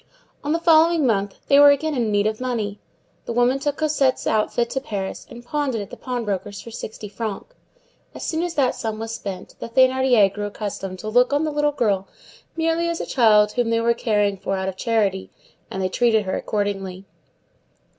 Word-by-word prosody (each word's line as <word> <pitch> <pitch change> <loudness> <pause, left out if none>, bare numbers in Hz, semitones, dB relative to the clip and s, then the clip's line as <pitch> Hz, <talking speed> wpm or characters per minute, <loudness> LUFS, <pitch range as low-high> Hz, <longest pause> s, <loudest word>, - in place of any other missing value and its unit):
On 290 - -2
the 325 - +2
following 330 -1 +4
month 200 -4 0
they 280 - +6
were 290 0 +9
again 300 +2 +2
in 235 -5 0
need 205 0 +2
of 215 +2 -1
money. 220 -5 -2 0.5
The - - -4
woman 245 +3 +2
took 290 +1 -2
Cosette's 290 -4 +1
outfit 225 +2 0
to 265 - -2
Paris, 200 -7 -5
and 240 0 -11
pawned 285 -1 -1
it - - -1
at 200 - -7
the - - -7
pawnbroker's 205 -6 -4
for 230 - -10
sixty 220 -1 -7
francs. 220 - -6 0.6
As - - -6
soon 320 0 -1
as 345 -1 -3
that 265 -4 +2
sum 220 -2 -4
was 225 +1 -5
spent, 195 -5 -6
the - - -6
Thénardiers 255 -5 +4
grew 205 0 -4
accustomed 195 -2 -5
to 215 - -8
look 245 +4 +3
on 290 +2 +2
the 310 - -1
little 295 0 +1
girl 205 -9 0 0.5
merely 330 +1 +1
as 335 - -2
a - - -3
child 210 -4 +4
whom 245 0 0
they 230 0 +2
were 235 +1 +2
caring 210 -4 0
for 195 +1 -2
out 190 0 -2
of 190 - -3
charity; 200 -3 0 0.4
and 190 - -4
they - - +2
treated 220 +1 +2
her 190 - -2
accordingly. 195 -2 -3
230 Hz, 205 wpm, -22 LUFS, 205-270 Hz, 0.6 s, were